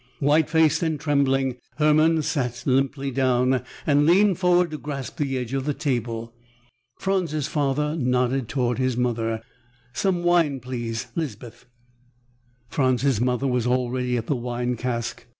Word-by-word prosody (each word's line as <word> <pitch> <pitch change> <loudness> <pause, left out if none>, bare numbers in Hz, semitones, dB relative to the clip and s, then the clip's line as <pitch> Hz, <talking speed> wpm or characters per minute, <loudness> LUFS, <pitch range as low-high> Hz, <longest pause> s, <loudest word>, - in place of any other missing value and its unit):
White 145 +4 +2
faced 160 -1 +3
and 160 -3 -1
trembling, 135 -3 +1 0.2
Hermann 155 +1 +3
sat 125 -4 -2
limply 135 +1 0
down 130 -1 +2 0.2
and 145 0 +3
leaned 190 +1 +4
forward 180 -2 +3
to 155 - -5
grasp 140 -1 -6
the 140 -4 -1
edge 125 0 -4
of 135 -1 -1
the 145 -1 -1
table. 115 -4 -3 0.6
Franz's 175 -7 -1
father 150 +1 0
nodded 125 -3 0
toward 125 -2 0
his 130 -2 0
mother. 115 -2 -1 0.5
"Some 175 +7 0
wine 170 -6 +3
please, 120 -3 -4
Lispeth." 125 -6 -6 1.0
Franz's 130 -4 +1
mother 125 +1 0
was 125 -2 0
already 125 0 0
at 115 - -3
the 145 - 0
wine 120 0 -2
cask. 120 -1 -4
135 Hz, 140 wpm, -24 LUFS, 125-150 Hz, 1.0 s, leaned